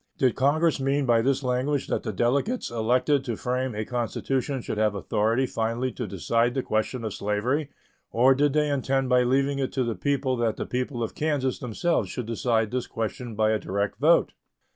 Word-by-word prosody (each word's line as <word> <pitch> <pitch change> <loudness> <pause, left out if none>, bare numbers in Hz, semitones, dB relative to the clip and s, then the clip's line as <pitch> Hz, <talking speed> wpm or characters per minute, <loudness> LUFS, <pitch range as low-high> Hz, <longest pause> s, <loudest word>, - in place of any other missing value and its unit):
Did 130 -3 +3
Congress 155 +4 +2
mean 135 +1 +1
by 120 -2 +4
this 135 +3 +1
language 130 +3 0
that - - -1
the 110 - -3
delegates 140 - 0
elected 125 +5 +1
to 120 -4 -2
frame 125 -1 -2
a 110 +1 -3
constitution 130 +3 -2
should 110 -2 -4
have 105 -2 +2
authority 110 +5 +1
finally 115 +2 -2
to 120 -3 -5
decide 115 - 0
the 130 - 0
question 110 +3 -1
of 110 -3 -3
slavery, 120 +9 -1 0.4
or 125 +3 +5
did 145 +1 +2
they 150 0 +2
intend 135 -1 0
by 125 -1 +5
leaving 135 +3 +1
it 135 - -1
to 130 - +1
the 120 -1 -1
people 130 +5 0
that 115 -2 0
the - - -3
people 125 -1 -2
of 115 - -4
Kansas 145 -4 -1
themselves 125 - -1
should 120 +5 -4
decide 115 -1 0
this 125 -1 -2
question 115 +1 -4
by 110 0 +2
a 110 - +1
direct 100 +1 -2
vote? - - +4
125 Hz, 195 wpm, -26 LUFS, 115-135 Hz, 0.4 s, or